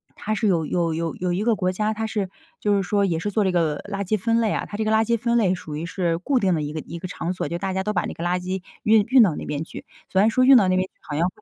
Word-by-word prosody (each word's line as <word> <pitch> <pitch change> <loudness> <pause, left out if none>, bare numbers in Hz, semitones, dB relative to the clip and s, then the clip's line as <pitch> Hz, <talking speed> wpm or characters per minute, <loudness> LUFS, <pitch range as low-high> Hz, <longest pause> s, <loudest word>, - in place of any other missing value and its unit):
它 215 +1 -3
是 215 +1 0
有 170 -5 +2
有 170 -2 0
有 165 0 -3
有 180 -1 -2
一 190 +4 -1
个 230 0 +2
国 185 -2 0
家， 210 +3 -1
它 220 +1 -3
是 205 -4 -2 0.3
就 205 -1 +2
是 195 - 0
说 205 0 +2
也 170 -4 0
是 205 +5 -3
做 215 +1 +1
这 190 - +1
个 160 -4 0
垃 200 0 -2
圾 215 - +1
分 230 +3 +1
类 220 -2 +1
啊， - - -1
它 205 - -6
这 220 - 0
个 215 - +1
垃 220 0 +4
圾 235 +1 +1
分 235 +1 +1
类 190 -4 +2
属 155 -4 -8
于 155 +3 -4
是 170 -2 -1
固 265 +9 0
定 190 -5 +2
的 160 - 0
一 145 0 -3
个 155 - -3
一 170 - -8
个 185 - -5
场 180 0 -4
所， 185 - -3
就 170 - -2
大 190 +1 -3
家 190 0 -1
都 210 +2 -1
把 175 - 0
那 - - -5
个 165 - -7
垃 175 +1 0
圾 185 +1 -4 0.2
运 215 -1 +5
运 255 -2 +7
到 175 -8 +2
那 - - -6
边 150 +1 -3
去。 - - -10 0.2
虽 190 - +3
然 215 - +5
说 255 +3 +2
运 270 +1 +8
到 200 -5 +4
那 185 - +2
边 185 - +2
去， - - -57
好 145 - -5
像， 170 +3 +2
190 Hz, 365 characters per minute, -23 LUFS, 175-215 Hz, 0.3 s, 运